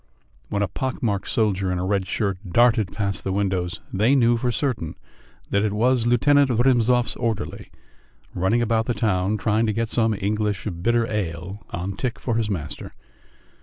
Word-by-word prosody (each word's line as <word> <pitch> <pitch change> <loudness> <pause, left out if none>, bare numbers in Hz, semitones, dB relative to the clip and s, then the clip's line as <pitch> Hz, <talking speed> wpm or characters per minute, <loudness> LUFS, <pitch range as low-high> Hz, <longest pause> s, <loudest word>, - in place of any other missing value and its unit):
When 100 - 0
a - - 0
pock 130 +9 -4
marked 100 -4 0
soldier 100 -4 +1
in 90 - -1
a 90 - -2
red 95 -1 0
shirt 100 -4 -1
darted 115 -2 +4
past 100 -2 -2
the 95 - -2
windows, 95 -1 -1
they 110 +8 +3
knew 120 -3 +4
for 120 +1 0
certain 120 - -2 0.6
that 100 +1 +2
it 105 -2 0
was 120 +2 +2
Lieutenant 140 +3 +4
Rymzov's 125 0 +3
orderly 115 -4 -3 0.6
running 95 +7 +1
about 115 -1 +1
the 120 - 0
town, 105 -1 +1
trying 110 +1 +1
to 110 - +1
get 115 +1 -1
some 110 -2 +2
English 105 0 -1 0.2
bitter 120 +3 +2
ale 95 -2 -4
on 95 +3 -4
tick 125 +2 -3
for 120 - -2
his 110 -2 0
master. 80 -6 -5
110 Hz, 170 wpm, -23 LUFS, 95-120 Hz, 0.6 s, darted